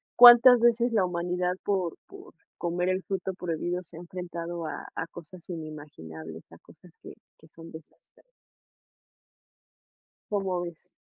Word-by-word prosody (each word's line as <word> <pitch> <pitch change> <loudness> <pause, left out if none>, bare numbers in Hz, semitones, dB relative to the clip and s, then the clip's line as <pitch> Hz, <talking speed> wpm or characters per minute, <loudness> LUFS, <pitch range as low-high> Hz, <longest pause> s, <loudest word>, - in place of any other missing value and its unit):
¿cuántas 245 0 +10
veces 235 0 +3
la 205 -5 +3
humanidad 180 +1 -1
por 185 -5 -1
por 390 -1 -14 0.2
comer 175 +1 -1
el 185 +1 0
fruto 190 -1 -3
prohibido, 175 0 -3
se 165 0 -12
ha - - -8
enfrentado 175 -1 -6
a - - -6
a - - -3
cosas 175 +2 -12
inimaginables, 145 - -9
a 85 - -13
cosas 170 +1 -20
que - - -10 0.2
que 160 - -19
son 165 +1 -13
desastre? 160 -1 -15 2.1
¿Cómo 190 -3 -1
ves? 170 -2 -9
175 Hz, 135 wpm, -27 LUFS, 165-190 Hz, 2.1 s, cuántas